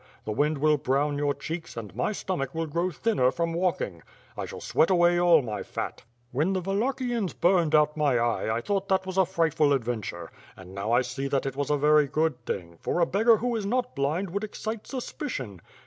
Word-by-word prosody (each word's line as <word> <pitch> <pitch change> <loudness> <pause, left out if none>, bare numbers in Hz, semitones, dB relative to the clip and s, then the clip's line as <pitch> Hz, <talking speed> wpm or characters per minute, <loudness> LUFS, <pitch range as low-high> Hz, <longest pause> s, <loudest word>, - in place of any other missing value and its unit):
The 110 - -3
wind 150 +7 +1
will 150 +1 +3
brown 145 +2 0
your 145 -1 +1
cheeks 160 0 -6
and 105 -4 -7
my 125 - 0
stomach 170 -9 -3
will 165 0 -1
grow 170 +4 -1
thinner 175 - +1
from 165 +3 -2
walking. 165 - -1 0.3
I - - -4
shall - - -8
sweat 160 - +2
away 175 -1 +4
all 170 -4 +5
my 110 -3 -4
fat. - - -5 0.3
When 160 +9 +1
theWallachians 225 +3 -1
burned 170 -3 +3
out 150 0 +4
my 145 -5 +2
eye 120 -1 0
I - - -2
thought 195 +5 -1
that 190 -1 +1
was 190 0 -2
a 190 - +4
frightful 160 -5 +2
adventure, 110 -9 -3 0.3
and 95 0 -12
now 100 +3 -3
I 120 +2 +4
see 135 +2 -4
that 140 -1 0
it 135 -1 -3
was 145 0 -2
a 150 - +2
very 150 0 +4
good 150 -3 0
thing; 85 -3 -5
for - - -1
a 170 - +5
beggar 220 +5 +4
who 240 +2 -1
is 210 -3 -2
not 250 +3 -1
blind 155 +7 -1
would 200 +3 -2
excite 215 +1 -5
suspicion. 235 - -5
155 Hz, 210 wpm, -27 LUFS, 135-190 Hz, 0.3 s, all